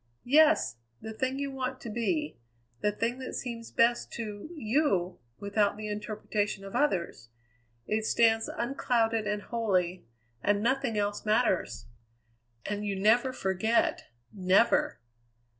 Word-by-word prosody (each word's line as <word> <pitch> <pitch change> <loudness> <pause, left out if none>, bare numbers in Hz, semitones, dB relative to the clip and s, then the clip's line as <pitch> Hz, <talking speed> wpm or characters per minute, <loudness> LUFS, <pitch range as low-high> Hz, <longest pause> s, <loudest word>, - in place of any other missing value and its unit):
"Yes; 305 - +4 0.2
the 220 - -7
thing 260 +4 -2
you 280 0 -3
want 260 -1 -4
to 235 - -6
be; 300 - -1 0.4
the 210 - +2
thing 230 +4 -2
that 260 - -6
seems 230 -2 -5
best 235 +1 +2
to 210 +2 -6
you 215 - +1 0.2
without 205 0 0
the 215 0 -5
interpretation 210 -1 -3
of 195 - -8
others. 170 - 0 0.6
It 215 +1 -1
stands 225 -1 +3
unclouded 230 -3 0
and 210 0 -2
holy; 185 - -1 0.3
and 205 +4 +1
nothing 250 -2 +1
else 205 0 -1
matters." 215 -3 +1 0.8
"And 205 0 -3
you 200 -2 -2
never 235 +6 +4
forget 220 +1 0 0.3
never!" 190 - +3
220 Hz, 125 wpm, -29 LUFS, 205-245 Hz, 0.8 s, Yes